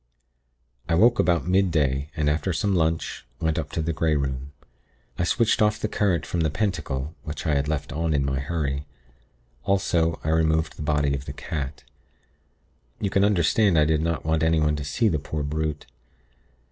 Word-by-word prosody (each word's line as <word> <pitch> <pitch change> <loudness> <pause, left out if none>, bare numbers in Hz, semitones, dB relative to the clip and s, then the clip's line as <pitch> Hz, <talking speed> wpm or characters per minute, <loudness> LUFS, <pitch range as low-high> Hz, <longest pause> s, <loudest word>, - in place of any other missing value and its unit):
"I 85 - +3
woke 115 +7 +5
about 85 -1 +2
midday, 80 -7 +1
and 75 -1 0
after 80 +5 0
some 100 +4 0
lunch, 80 -1 0 0.2
went 80 0 0
up 75 - -5
to 80 - -1
the 85 +1 -1
Grey 80 0 +1
Room. 70 -1 -3 0.7
I - - +2
switched 115 +5 +2
off 105 0 +3
the - - -1
current 95 -6 0
from 85 - -3
the 80 -1 +2
Pentacle, 75 -5 -2
which 75 +1 -6
I 80 - +2
had 70 0 +1
left 75 -1 -2
on 80 +2 -1
in 70 -1 +1
my 70 -1 -1
hurry; 70 -1 -2 0.8
also, 85 -4 +1
I 80 - -1
removed 80 0 +1
the - - -9
body 75 -1 +1
of 70 0 -4
the - - -6
cat. 70 -2 -5 1.2
You 100 - -1
can 100 - +3
understand 100 -1 +3
I 75 - +5
did 80 0 +2
not 85 0 -2
want 80 0 +1
anyone 80 -2 +2
to 75 - -4
see 75 +11 +1
the 80 -7 +1
poor 75 +1 -4
brute. 75 0 -2
80 Hz, 185 wpm, -25 LUFS, 75-85 Hz, 1.2 s, woke